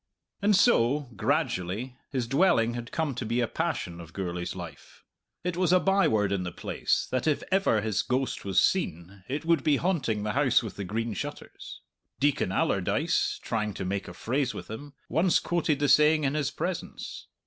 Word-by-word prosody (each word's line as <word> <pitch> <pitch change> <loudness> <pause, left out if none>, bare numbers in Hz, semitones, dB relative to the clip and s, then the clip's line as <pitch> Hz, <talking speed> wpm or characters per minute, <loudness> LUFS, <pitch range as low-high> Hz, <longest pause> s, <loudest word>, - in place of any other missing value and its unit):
And 205 +1 +4
so, 145 - +3
gradually, 95 +6 -1
his 130 -4 -1
dwelling 120 -4 +3
had 120 0 -6
come 160 -4 -1
to 125 - -4
be 115 +2 -1
a 120 - +2
passion 100 - -3
of 80 -1 -12
Gourlay's 90 -2 -4
life. 85 -5 -10 0.4
It 180 0 -2
was 180 -1 +2
a 185 - +6
by 195 +1 +3
word 105 -3 +1
in 100 -2 0
the 90 -1 -4
place - - -1
that 130 +3 0
if 150 - +1
ever 190 - +3
his 105 -2 0
ghost 130 0 -1
was 95 -2 +2
seen, 95 - -1
it 145 +5 -3
would 165 -4 +3
be 145 -2 +3
haunting 135 - 0
the 105 - -1
House 135 -3 +3
with 110 - -6
the 100 - -5
Green 115 +4 -2
Shutters. - - -7 0.4
Deacon 145 -9 +1
Allardyce, - - +1
trying 105 -2 -2
to 95 - -4
make 100 +1 -2
a - - -9
phrase 130 +2 -1
with - - -8
him, 140 +6 -8
once 170 +3 +3
quoted 165 -4 0
the 145 +1 +1
saying 150 +2 +5
in 135 0 +1
his 150 -2 0
presence. 175 +4 -5
125 Hz, 190 wpm, -28 LUFS, 105-155 Hz, 0.4 s, a